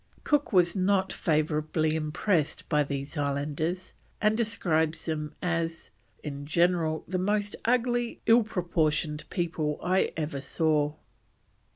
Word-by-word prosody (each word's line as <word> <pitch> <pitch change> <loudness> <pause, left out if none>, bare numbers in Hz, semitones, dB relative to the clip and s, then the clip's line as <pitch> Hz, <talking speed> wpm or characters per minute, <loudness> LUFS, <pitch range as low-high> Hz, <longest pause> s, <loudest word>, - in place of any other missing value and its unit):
Cook 295 -2 +1
was 175 -3 +4
not 190 0 +2
favourably 155 0 +1
impressed 155 +1 0
by 150 -2 +3
these 140 +2 -5
islanders, 150 +5 -2 0.3
and 215 0 +3
describes 165 -8 0
them 150 -2 -3
as 165 -2 -2 0.3
"in 145 -1 -6
general, 170 -1 +2
the 185 +1 -1
most 205 +2 0
ugly 240 0 +1
ill 230 +2 +6
proportioned 155 -6 -1
people 160 -4 -1
I 185 +2 +2
ever 150 -3 -3
saw." 150 +1 +1
165 Hz, 115 wpm, -28 LUFS, 150-185 Hz, 0.3 s, ill